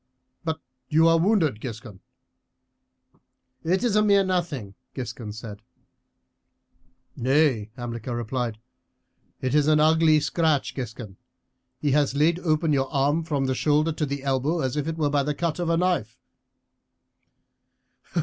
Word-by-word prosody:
But 160 -1 -2 0.3
you 160 +2 +4
are 165 0 +4
wounded, 165 - +2
Giscon." 115 -5 -8 1.6
"It 180 +5 +1
is 235 -4 +1
a 210 - +5
mere 200 -2 +4
nothing," 170 - -2 0.2
Giscon 115 -3 -6
said. 105 -1 -9 1.5
"Nay," 130 -4 +2
Hamilcar 120 0 -5
replied, 120 -1 -3 0.8
"it 130 - -1
is 150 -1 +3
an 155 -1 +4
ugly 155 0 +5
scratch, 155 -1 0
Giscon; 110 -6 -7 0.6
he 145 - -1
has 145 -1 +2
laid 160 +4 +3
open 155 -2 +1
your 135 -1 0
arm 145 +4 +1
from 145 -4 -1
the 130 - 0
shoulder 150 +6 +2
to 155 -1 -2
the 140 0 -4
elbow 140 +5 0
as 130 -1 -1
if 150 0 -2
it 165 0 -3
were 150 -3 +1
by 145 -1 +2
the 145 +1 -2
cut 170 +1 -2
of 175 -1 -1
a 165 - +2
knife." 165 -11 0
145 Hz, 140 wpm, -25 LUFS, 125-165 Hz, 1.6 s, a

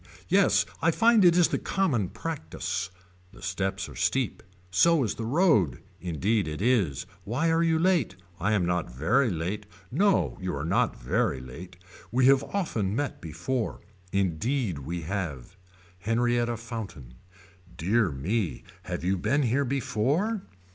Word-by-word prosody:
Yes - - +4 0.2
I - - +4
find 230 -2 +5
it 175 -1 +6
is 175 - +5
the - - 0
common 135 - 0
practice. 95 - -4 0.4
The - - -14
steps 95 +1 -2
are - - -11
steep. 130 -4 0 0.3
So 165 - +4
is 110 - -1
the 115 - -5
road. 130 - +3 0.2
Indeed 90 +4 0
it 75 0 -4
is. 100 - +1 0.2
Why 140 +10 0
are 165 0 +3
you 165 -1 +3
late. 165 - +2 0.2
I 100 +5 +1
am 95 -5 +2
not 90 -1 0
very 110 - +2
late. 95 +4 -3 0.2
No 195 +8 +2
you 90 -3 -2
are 70 +2 -3
not 85 - +1
very 65 - 0
late. 80 +9 -10 0.3
We 125 +1 +3
have 135 +1 +6
often 110 - -1
met 145 +1 -2
before. 90 - -3 0.3
Indeed 100 - 0
we 85 +5 -4
have. 85 -3 -4 0.4
Henrietta 120 +3 +1
Fountain. 105 - -7 0.6
Dear 105 +4 +2
me 90 - -2 0.2
have - - -4
you 95 +1 +1
been 130 +10 +1
here 130 +4 +1
before. 140 - 0
110 Hz, 150 wpm, -27 LUFS, 90-135 Hz, 0.6 s, it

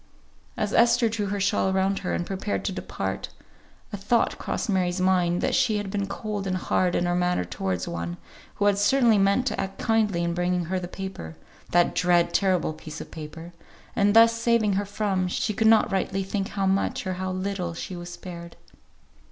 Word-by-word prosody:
As 210 0 -1
Esther 235 0 +4
drew 215 -2 -2
her 200 +1 -2
shawl 195 0 +1
around 190 +1 +1
her, 180 - -3
and 175 - -2
prepared 195 +2 -3
to - - 0
depart, 95 - -4 0.6
a - - -2
thought 215 +4 +1
crossed - - -3
Mary's 185 -3 0
mind 180 -2 +2
that 265 - 0
she 245 -5 +2
had 205 -2 -4
been 200 -1 -2
cold 205 0 -4
and 185 -1 0
hard 180 0 +1
in 175 - +1
her 175 - +1
manner 180 - +1
towards 90 +1 -3
one, 85 0 -4 0.4
who 205 - 0
had 200 -1 +3
certainly 230 0 +4
meant 200 +6 +3
to - - -1
act 195 0 -5
kindly 210 -6 +1
in 170 0 -1
bringing 180 0 0
her 185 +3 -1
the 175 - -5
paper 185 - -7 0.3
(that 175 0 +3
dread, 175 -1 +2
terrible 185 -5 +1
piece 155 0 -9
of - - -9
paper) 160 +2 -9 0.4
and 205 +1 +3
thus 230 0 +7
saving 230 -3 +2
her 200 +1 0
from 200 -2 -1
she 210 +4 -1
could 220 +2 +2
not 220 -1 +5
rightly 195 0 -1
think 195 0 -2
how 200 -2 -2
much, 190 0 0
or 185 - -1
how 185 +1 -3
little 185 -2 -3
she 180 - -6
was 175 0 -7
spared. 170 -1 -9
190 Hz, 200 wpm, -25 LUFS, 175-205 Hz, 0.6 s, thus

